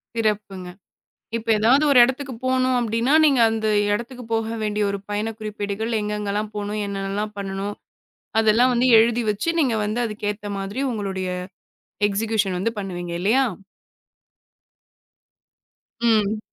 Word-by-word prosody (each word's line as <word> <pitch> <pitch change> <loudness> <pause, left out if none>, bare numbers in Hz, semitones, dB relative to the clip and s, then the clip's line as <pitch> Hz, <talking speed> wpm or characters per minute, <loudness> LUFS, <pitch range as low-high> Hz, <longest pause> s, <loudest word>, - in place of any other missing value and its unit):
சிறப்புங்க. 205 -5 -2 0.7
இப்ப 230 - -9
ஏதாவது 255 +7 +4
ஒரு 255 - +7
இடத்துக்குப் 260 -1 -2
போணும் 255 0 +2
அப்படின்னா, 230 +3 0
நீங்க 275 -4 +4
அந்த 220 -1 -1 0.3
இடத்துக்குப் 235 +2 -5
போக 225 0 -1
வேண்டிய 210 0 0
ஒரு 200 - -3
பயணக் 215 +2 -3
குறிப்பேடுகள், 210 +1 -4
எங்கெங்க 210 -1 -3
எல்லாம் 210 +1 -2
போகணும்? 210 +1 -3
என்னன்னலாம் 200 +1 -3
பண்ணணும்? 195 +1 -4 0.7
அதெல்லாம் 225 +4 +4
வந்து 245 +2 +2
எழுதி 235 +1 +3
வச்சு, 210 +10 -3
நீங்க 255 -6 +2
வந்து 215 +3 -2
அதுக்கு 210 -1 -6
ஏத்த 205 0 -11
மாதிரி 200 +7 -4
உங்களுடைய 195 -4 -3 0.8
எக்சிகுயூஷன் 210 -2 0
வந்து 230 +4 0
பண்ணுவீங்க 175 -3 -5
இல்லையா? 225 +8 +3 2.6
ம். 220 -2 +2
215 Hz, 125 wpm, -22 LUFS, 205-235 Hz, 2.6 s, ஒரு